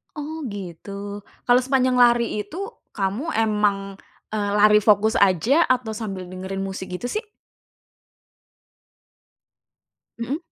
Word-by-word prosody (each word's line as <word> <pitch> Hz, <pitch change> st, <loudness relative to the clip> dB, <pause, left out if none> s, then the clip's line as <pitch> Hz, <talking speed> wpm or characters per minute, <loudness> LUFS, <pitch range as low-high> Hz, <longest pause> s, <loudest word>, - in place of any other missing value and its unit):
Oh 305 Hz, +1 st, -5 dB
gitu. 200 Hz, +1 st, -7 dB, 0.2 s
Kalau 245 Hz, 0 st, +5 dB
sepanjang 255 Hz, -1 st, +2 dB
lari 240 Hz, -3 st, +4 dB
itu, 380 Hz, -, -6 dB, 0.3 s
kamu 205 Hz, -, -2 dB
memang, 210 Hz, -3 st, +1 dB, 0.3 s
eee, 205 Hz, -1 st, -1 dB
lari 210 Hz, 0 st, +6 dB
fokus 210 Hz, +1 st, +3 dB
saja, 210 Hz, -, +4 dB
atau 250 Hz, -3 st, +1 dB
sambil 210 Hz, -4 st, -5 dB
dengerin 190 Hz, +1 st, -5 dB
musik 190 Hz, -1 st, -5 dB
gitu 240 Hz, -, -4 dB
sih? 430 Hz, +1 st, -3 dB, 2.9 s
Mhm. 240 Hz, +5 st, -2 dB
210 Hz, 110 wpm, -23 LUFS, 195-250 Hz, 2.9 s, lari